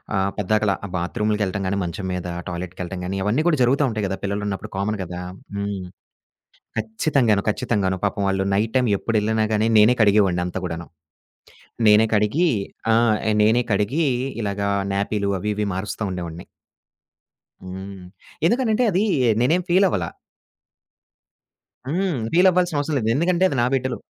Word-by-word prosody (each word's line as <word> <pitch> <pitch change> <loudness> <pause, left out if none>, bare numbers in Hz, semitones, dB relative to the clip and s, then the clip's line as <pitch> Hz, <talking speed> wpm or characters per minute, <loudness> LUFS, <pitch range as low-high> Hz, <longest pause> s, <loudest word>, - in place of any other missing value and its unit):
ఆహ్, 95 +1 +1
పెద్దాకలా 105 0 +1
ఆ - - -5
బాత్రూమ్లకి 105 +4 -1
వెళ్ళటం 95 +1 -2
గాని, 100 - -1
మంచం 85 +3 -5
మీద 90 -1 -4 0.2
టాయిలెట్కి 90 +1 -6
వెళ్ళటం 90 +1 -5
గానీ 95 +2 -3
అవన్నీ 115 +9 +1
కూడా 155 -4 +3
జరుగుతూ 135 +4 +3
ఉంటాయి 110 -3 -2
కదా. 95 - -2
పిల్లలున్నప్పుడు 100 0 -3
కామన్ 105 +2 -1
కదా! 90 0 -6 0.3
హ్మ్. 100 -2 -3 0.9
ఖచ్చితంగాను. 110 -1 +1
ఖచ్చితంగాను. 95 -2 0
పాపం 100 0 -1
వాళ్ళు 95 0 0
నైట్ 110 +3 0
టైమ్ 125 -2 +3
ఎప్పుడేళ్ళినా 110 0 0
గాని, 110 +1 +2
నేనే 110 +4 +6
కడిగేవాడిని 100 -4 +4
అంతా 90 +1 -4
కూడాను. 85 0 -5 1.0
నేనే 105 +1 +6
కడిగి 110 +12 +2 0.5
ఆ! - - +5 0.5
నేనే 115 +3 +3
కడిగి 130 +11 +1 0.4
ఇలాగా 100 -1 -2 0.2
న్యాపీలు 100 0 -1
అవి 105 +3 -2
ఇవి 105 -1 -1
మారుస్తా 100 +3 -4
ఉండేవాడిని. 85 -2 -6 1.2
హ్మ్. 95 0 -8 0.4
ఎందుకనంటే, 235 +2 +2
అదీ 195 +4 +2 0.4
నేనేం 170 +8 +2
ఫీలవ్వల. 180 - +3 1.8
హ్మ్. 170 -3 -1
ఫీలవ్వాల్సిన 180 -2 +4
అవసరం 145 0 -1
లేదు. 110 -2 -1
ఎందుకంటే, 175 +5 +2
అది 135 - -3
నా - - +3
బిడ్డలు. 130 -1 -1
105 Hz, 140 wpm, -22 LUFS, 95-125 Hz, 1.8 s, నేనే